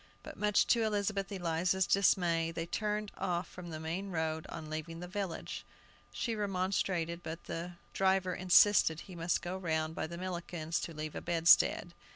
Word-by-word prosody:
But -, -, -9 dB
much 210 Hz, -1 st, +3 dB
to 235 Hz, -, +3 dB
Elizabeth 205 Hz, -2 st, 0 dB
Eliza's 175 Hz, 0 st, +1 dB
dismay, 175 Hz, -4 st, +3 dB
they 165 Hz, 0 st, -3 dB
turned 210 Hz, +3 st, -2 dB
off 175 Hz, -1 st, -1 dB
from 180 Hz, -1 st, -9 dB
the 155 Hz, -1 st, -5 dB
main 170 Hz, +5 st, -3 dB
road 160 Hz, -2 st, -2 dB
on 160 Hz, -2 st, -7 dB
leaving 155 Hz, +2 st, -5 dB
the 180 Hz, -, -6 dB
village. 190 Hz, -2 st, -4 dB, 0.5 s
She 235 Hz, -, -2 dB
remonstrated, 185 Hz, -4 st, -1 dB
but 165 Hz, 0 st, -6 dB
the 170 Hz, +2 st, -5 dB, 0.2 s
driver 190 Hz, -1 st, +2 dB
insisted 180 Hz, -2 st, +5 dB
he 190 Hz, -, -11 dB
must 170 Hz, 0 st, 0 dB
go 180 Hz, +1 st, -3 dB
round 160 Hz, -3 st, -1 dB
by 160 Hz, -, -3 dB
Millikin's 170 Hz, -1 st, -3 dB
to 165 Hz, -, -5 dB
leave 155 Hz, 0 st, -5 dB
a -, -, -5 dB
bedstead. 170 Hz, +1 st, +4 dB
175 Hz, 165 wpm, -33 LUFS, 165-195 Hz, 0.5 s, insisted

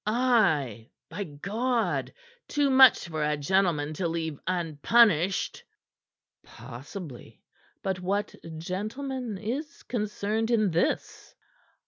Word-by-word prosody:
"Ay, 195 Hz, -, +2 dB, 0.2 s
by 195 Hz, +5 st, -3 dB
God! 185 Hz, -, -1 dB, 0.4 s
Too 290 Hz, -2 st, +1 dB
much 260 Hz, -7 st, +7 dB
for 155 Hz, -2 st, -2 dB
a 150 Hz, 0 st, +1 dB
gentleman 155 Hz, -1 st, +1 dB
to 170 Hz, +3 st, -1 dB
leave 160 Hz, -3 st, -3 dB
unpunished." 180 Hz, +2 st, +2 dB, 0.8 s
"Possibly. 130 Hz, -, -10 dB, 0.4 s
But 190 Hz, -1 st, -1 dB
what 200 Hz, +3 st, -1 dB, 0.2 s
gentleman 215 Hz, -, -4 dB
is 260 Hz, +10 st, -5 dB
concerned 215 Hz, -1 st, -2 dB
in 215 Hz, -5 st, +2 dB
this?" 165 Hz, -, -1 dB
190 Hz, 95 wpm, -27 LUFS, 155-225 Hz, 0.8 s, much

